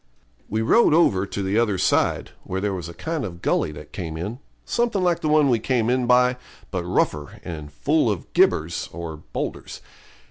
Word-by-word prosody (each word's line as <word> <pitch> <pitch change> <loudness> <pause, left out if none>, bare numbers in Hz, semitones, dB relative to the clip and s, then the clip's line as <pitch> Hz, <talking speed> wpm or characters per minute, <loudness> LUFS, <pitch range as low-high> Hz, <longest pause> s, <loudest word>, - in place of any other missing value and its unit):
We 110 +2 0
rode 190 - +5
over 100 - +3
to 100 - -4
the 100 +4 +1
other 105 -5 +1
side, - - +1
where 95 - -3
there 100 0 -1
was 90 -3 -5
a - - -8
kind 160 -3 -3
of 85 -5 -7
gully - - +1
that 75 0 -11
came 80 -4 -5
in, 105 +9 -5 0.3
something 235 -5 0
like 175 -2 +2
the 155 - -1
one 150 -1 +5
we 120 -4 +3
came 120 0 +1
in 125 -1 +1
by, 125 0 +4 0.3
but - - -2
rougher, 75 -1 -1
and 75 -3 -7
full 145 - +1
of 100 -7 -4
gibbers - - +2 0.4
(boulders). - - -5
110 Hz, 185 wpm, -23 LUFS, 90-140 Hz, 0.4 s, rode